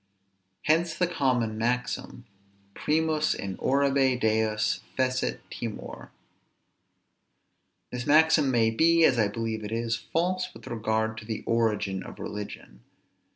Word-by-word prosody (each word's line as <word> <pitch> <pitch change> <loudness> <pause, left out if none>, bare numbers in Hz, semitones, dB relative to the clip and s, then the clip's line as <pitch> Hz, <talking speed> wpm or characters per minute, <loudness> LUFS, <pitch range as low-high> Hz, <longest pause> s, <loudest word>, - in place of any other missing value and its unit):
Hence 165 +2 +2
the 180 - +2
common 125 -10 0
maxim, 125 +1 -2 0.5
Primus 155 +2 +1
in 95 -1 -5
orbe 135 -2 +2
deos 110 -1 +1 0.2
fecit 130 0 0
timor. 115 -3 -7 1.8
This 125 +1 -5
maxim 155 -1 +5
may 115 -3 +3
be, 165 +7 +4
as 125 -6 +4
I 105 - +4
believe 110 +1 -3
it 105 - -6
is, 115 0 -1 0.2
false 180 +2 0
with - - -12
regard 110 -1 -1
to 110 - -12
the 110 -1 -4
origin 105 -4 0
of - - -10
religion. 100 -12 -7
120 Hz, 120 wpm, -27 LUFS, 110-150 Hz, 1.8 s, maxim